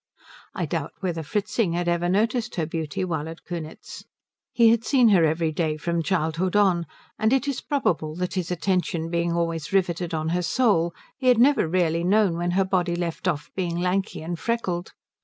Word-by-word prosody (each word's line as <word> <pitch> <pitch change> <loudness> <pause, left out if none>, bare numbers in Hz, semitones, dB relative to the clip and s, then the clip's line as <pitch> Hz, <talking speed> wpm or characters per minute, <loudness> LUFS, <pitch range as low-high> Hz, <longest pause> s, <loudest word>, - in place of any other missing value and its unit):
I - - -1
doubt - - -3
whether 175 -4 -2
Fritzing 205 +3 -1
had 175 0 -1
ever 175 0 +1
noticed 225 +5 0
her 165 - 0
beauty 160 +1 -3
while 160 -3 -3
at 165 - -10
Kunitz. 165 -3 -7 0.5
He 230 -1 +5
had 230 0 +3
seen 250 -2 +4
her 190 -5 +5
every 160 +1 +1
day 155 -1 -1
from 170 +2 -1
childhood 170 +1 -1
on, 185 -5 +3 0.3
and 220 +1 +2
it 270 +1 +2
is 275 -3 -2
probable 160 - -1
that 180 +1 -3
his 180 -3 -2
attention 175 -2 -1
being 170 0 0
always 165 -2 -2
riveted 175 -3 0
on 155 0 -2
her 175 +2 0
soul 175 -3 +2 0.3
he 260 - -2
had 250 -2 +6
never 265 - +4
really 170 -1 +1
known 195 -1 +3
when 175 +1 -1
her 195 - +3
body 180 -2 0
left 175 +1 -3
off 150 -4 -2
being 175 -3 -2
lanky 185 -1 -1
and 170 0 -4
freckled. 185 -5 -2
175 Hz, 190 wpm, -24 LUFS, 165-195 Hz, 0.5 s, had